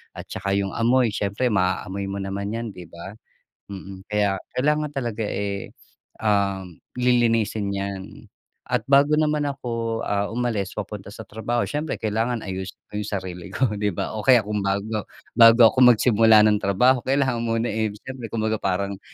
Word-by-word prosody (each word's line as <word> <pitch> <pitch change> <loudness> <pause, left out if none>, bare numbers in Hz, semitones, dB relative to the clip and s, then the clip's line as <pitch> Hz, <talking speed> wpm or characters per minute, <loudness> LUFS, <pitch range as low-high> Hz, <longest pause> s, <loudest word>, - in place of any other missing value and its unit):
at - - -9
tsaka 100 0 -3
yung 100 -1 0
amoy, 120 +1 +3
siyempre 105 +5 -1
maaamoy 95 0 -1
mo 100 0 -4
naman 100 +2 -4
yan, 115 0 -3
'di 90 -3 -10
ba? 85 +6 -10 0.5
Mm, 95 0 -9
kaya 105 -2 +1 0.2
kailangan 150 +3 0
talaga, 120 -5 -3
eh, 100 -1 -3 0.5
um, 100 -4 0 0.2
lilinisin 115 -4 +2
'yan. 100 -1 -4 0.6
At - - 0
bago 140 +2 +4
naman 150 -1 +1
ako, 115 -4 -3
ah, 100 0 0
umalis 115 -4 -2
papunta 105 -1 -6
sa 110 +2 -9
trabaho 115 +3 -2
siyempre, 150 +1 -3
kailangan 115 +2 -1
ayusin 95 0 -5 0.2
ko 105 - -3
yung 105 - -5
sarili 90 0 -7
ko, 130 - -2 0.2
di 105 - +1
ba? - - -3
O 110 - -4
kaya 125 -4 +6
kung 105 0 -2
bago 100 +2 -1 0.4
bago 115 +1 +8
ako - - -16
magsimula 110 -2 +6
ng 105 -1 +3
trabaho 125 +7 +3
kailangan 130 -3 +1
muna, 115 0 -1
eh, 110 0 0 0.2
siyempre 130 -3 -7
kumbaga 110 -1 -1
parang, 100 +1 -1
110 Hz, 165 wpm, -23 LUFS, 100-120 Hz, 0.6 s, bago